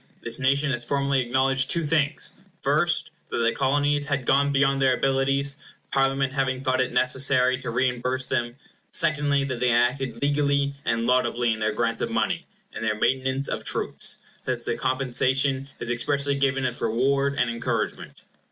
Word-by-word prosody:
This 115 Hz, +1 st, -2 dB
nation 140 Hz, +2 st, +2 dB
has 120 Hz, -2 st, -2 dB
formally 140 Hz, +1 st, +1 dB
acknowledged 130 Hz, +2 st, +1 dB
two 170 Hz, -, +1 dB
things: 145 Hz, -1 st, 0 dB, 0.3 s
first, -, -, +1 dB, 0.2 s
that -, -, -3 dB
the 115 Hz, 0 st, +2 dB
Colonies 145 Hz, +2 st, +1 dB
had 140 Hz, -3 st, -1 dB
gone 140 Hz, +2 st, +3 dB
beyond 135 Hz, 0 st, +2 dB
their 130 Hz, -1 st, +4 dB
abilities, 135 Hz, +1 st, +1 dB, 0.3 s
Parliament 135 Hz, 0 st, +1 dB
having 130 Hz, -2 st, -1 dB
thought 130 Hz, -1 st, +1 dB
it 130 Hz, -, -1 dB
necessary 130 Hz, 0 st, +2 dB
to -, -, -5 dB
reimburse 125 Hz, +1 st, 0 dB
them; 120 Hz, -2 st, -2 dB, 0.3 s
secondly, 145 Hz, -3 st, +2 dB
that 130 Hz, -3 st, -3 dB
they 125 Hz, 0 st, +2 dB
had 120 Hz, +1 st, +4 dB
acted 130 Hz, -3 st, -6 dB
legally 140 Hz, 0 st, +1 dB
and 115 Hz, 0 st, 0 dB
laudably 120 Hz, -1 st, +2 dB
in 110 Hz, -, -6 dB
their 110 Hz, 0 st, 0 dB
grants 115 Hz, +1 st, -1 dB
of -, -, -1 dB
money, -, -, -1 dB, 0.3 s
and -, -, -6 dB
their 110 Hz, -1 st, 0 dB
maintenance 130 Hz, +2 st, +1 dB
of -, -, -3 dB
troops, -, -, -1 dB, 0.3 s
since -, -, -3 dB
the -, -, -2 dB
compensation 130 Hz, +1 st, 0 dB
is 120 Hz, -, -3 dB
expressly 140 Hz, +4 st, 0 dB
given 135 Hz, -1 st, 0 dB
as 125 Hz, -1 st, -3 dB
reward 135 Hz, +5 st, +1 dB
and 120 Hz, -3 st, +1 dB
encouragement. 115 Hz, 0 st, -3 dB
135 Hz, 170 wpm, -25 LUFS, 125-140 Hz, 0.3 s, their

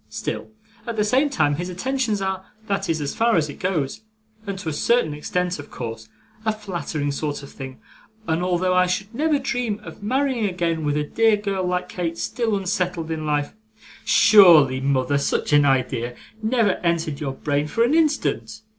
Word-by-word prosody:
Still -, -, -4 dB, 0.4 s
at 235 Hz, -, -3 dB
the 210 Hz, -, +2 dB
same 260 Hz, +7 st, +2 dB
time, 145 Hz, -, +1 dB
his 175 Hz, +2 st, -4 dB
attentions 220 Hz, +1 st, -1 dB
are 190 Hz, -1 st, -2 dB, 0.2 s
that 195 Hz, -3 st, -2 dB
is, 160 Hz, -1 st, +1 dB
as 145 Hz, -, -2 dB
far 230 Hz, 0 st, +2 dB
as 155 Hz, -3 st, +1 dB
it -, -, -13 dB
goes, 180 Hz, -1 st, -1 dB, 0.5 s
and 200 Hz, -1 st, -3 dB
to 185 Hz, -4 st, -4 dB
a -, -, -3 dB
certain 195 Hz, -1 st, +2 dB
extent 180 Hz, +3 st, -2 dB
of 145 Hz, -, -9 dB
course 115 Hz, -2 st, -7 dB, 0.3 s
a 220 Hz, -, +2 dB
flattering 175 Hz, -8 st, -3 dB
sort 145 Hz, 0 st, -3 dB
of 140 Hz, -, -11 dB
thing; 130 Hz, -2 st, -9 dB, 0.5 s
and 160 Hz, +1 st, 0 dB
although 180 Hz, 0 st, +1 dB
I 180 Hz, 0 st, +4 dB
should 195 Hz, +4 st, -2 dB
never 300 Hz, +4 st, +2 dB
dream 245 Hz, -6 st, -2 dB
of -, -, -11 dB
marrying 255 Hz, +1 st, 0 dB
again 170 Hz, -3 st, -1 dB
with 145 Hz, 0 st, 0 dB
a 150 Hz, -, +1 dB
dear 225 Hz, +7 st, +3 dB
girl 195 Hz, -3 st, -2 dB
like 180 Hz, 0 st, -1 dB
Kate 170 Hz, -2 st, -3 dB
still 230 Hz, +1 st, -1 dB
unsettled 180 Hz, -4 st, -2 dB
in 155 Hz, -1 st, -3 dB
life 145 Hz, -1 st, 0 dB, 0.3 s
' -, -, -19 dB
'Surely, 165 Hz, -11 st, +7 dB
mother, 140 Hz, +1 st, +1 dB
such 140 Hz, -, -1 dB
an 145 Hz, 0 st, +6 dB
idea 125 Hz, -3 st, 0 dB, 0.3 s
never 220 Hz, -3 st, +2 dB
entered 165 Hz, -4 st, -1 dB
your 140 Hz, -4 st, -3 dB
brain 145 Hz, +2 st, -1 dB
for 230 Hz, +9 st, +1 dB
an 240 Hz, +5 st, +2 dB
instant? 300 Hz, -8 st, 0 dB
180 Hz, 190 wpm, -23 LUFS, 150-215 Hz, 0.5 s, Surely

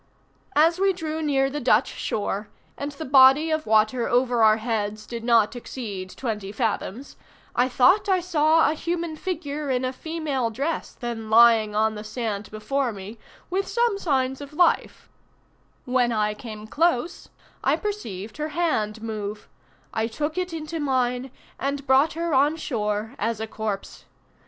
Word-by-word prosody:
"As 330 Hz, +4 st, +4 dB
we 390 Hz, 0 st, +3 dB
drew 320 Hz, -3 st, -4 dB
near 275 Hz, -3 st, +2 dB
the 295 Hz, -, -3 dB
Dutch 240 Hz, -2 st, +3 dB
shore, 205 Hz, 0 st, -3 dB, 0.3 s
and 285 Hz, +1 st, -4 dB
the 315 Hz, +3 st, -7 dB
body 270 Hz, +4 st, +6 dB
of 315 Hz, 0 st, -1 dB
water 220 Hz, +3 st, +3 dB
over 245 Hz, -1 st, +2 dB
our 215 Hz, 0 st, +6 dB
heads 215 Hz, -2 st, -2 dB
did 230 Hz, 0 st, -6 dB
not 230 Hz, -1 st, +3 dB
exceed 210 Hz, -6 st, -6 dB
twenty 210 Hz, -6 st, -3 dB
fathoms, 225 Hz, +3 st, -3 dB, 0.4 s
I 250 Hz, +1 st, +3 dB
thought 265 Hz, -, +4 dB
I 375 Hz, -1 st, +4 dB
saw 320 Hz, -3 st, +3 dB
a -, -, -1 dB
human 335 Hz, 0 st, -3 dB
figure 300 Hz, -4 st, -4 dB
in 255 Hz, -1 st, 0 dB
a 255 Hz, -, -2 dB
female 295 Hz, -5 st, -2 dB
dress 280 Hz, +9 st, -3 dB
then 230 Hz, -2 st, -5 dB
lying 225 Hz, -2 st, +6 dB
on 220 Hz, +1 st, +2 dB
the 210 Hz, 0 st, -7 dB
sand 215 Hz, -2 st, -4 dB
before 250 Hz, +4 st, -1 dB
me 205 Hz, +2 st, -9 dB, 0.3 s
with 390 Hz, +2 st, 0 dB
some 470 Hz, -4 st, +1 dB
signs 265 Hz, -5 st, 0 dB
of 285 Hz, +1 st, -9 dB
life; 345 Hz, +2 st, +1 dB, 0.8 s
when 250 Hz, -2 st, +2 dB
I 210 Hz, -2 st, +1 dB
came 215 Hz, -1 st, -9 dB
close 315 Hz, +4 st, 0 dB, 0.3 s
I -, -, +3 dB
perceived 225 Hz, -, -5 dB
her 305 Hz, 0 st, -3 dB
hand 220 Hz, -11 st, 0 dB
move: 210 Hz, -2 st, -5 dB, 0.5 s
I 220 Hz, 0 st, 0 dB
took 295 Hz, +7 st, -3 dB
it 365 Hz, -1 st, -2 dB
into 325 Hz, 0 st, -5 dB
mine, 255 Hz, -2 st, 0 dB, 0.3 s
and 280 Hz, 0 st, -2 dB
brought 270 Hz, +3 st, +4 dB
her 335 Hz, -1 st, -2 dB
on 285 Hz, +4 st, +4 dB
shore 215 Hz, -6 st, -2 dB
as 225 Hz, 0 st, -1 dB
a 220 Hz, -, -2 dB
corpse. 215 Hz, -2 st, -5 dB
255 Hz, 160 wpm, -24 LUFS, 220-310 Hz, 0.8 s, body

